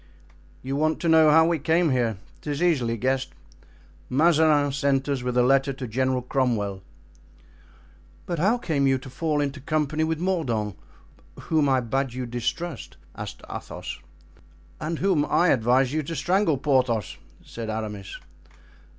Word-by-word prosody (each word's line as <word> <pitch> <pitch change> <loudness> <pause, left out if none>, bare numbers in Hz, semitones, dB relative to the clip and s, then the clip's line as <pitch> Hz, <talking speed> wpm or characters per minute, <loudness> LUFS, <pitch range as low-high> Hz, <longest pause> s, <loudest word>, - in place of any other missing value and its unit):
"You 135 +2 -3
want 155 +2 +1
to 170 - -1
know 160 -1 +6
how 160 +2 +6
we 165 -1 +1
came 160 +2 +2
here? 120 -5 0 0.2
'Tis 150 +2 -3
easily 125 -10 +1
guessed. 130 -2 -1 0.8
Mazarin 150 0 +3
sent 140 -1 0
us 140 -3 -1
with 125 0 -2
a 125 - +5
letter 135 +2 +3
to 130 -1 -6
General 130 +2 0
Cromwell." 115 -7 -1 1.4
"But 170 -3 -3
how 205 +9 +3
came 150 - 0
you 135 0 +3
to 130 0 -11
fall 155 +1 -1
into 140 0 -3
company 155 +1 0
with 160 0 0
Mordaunt, 125 - -1 0.6
whom 155 -3 +1
I 130 -1 +3
bade 135 +2 -2
you 125 0 -4
distrust?" 125 +6 -4 0.2
asked - - -8
Athos. - - -7 0.8
"And 160 +2 -3
whom 185 -5 +2
I 175 +3 +2
advised 125 +1 +3
you 155 +1 0
to 165 +3 -5
strangle, 180 -3 +1
Porthos," 130 - 0 0.3
said 115 -1 -7
Aramis. 105 -3 -5
140 Hz, 150 wpm, -25 LUFS, 125-160 Hz, 1.4 s, know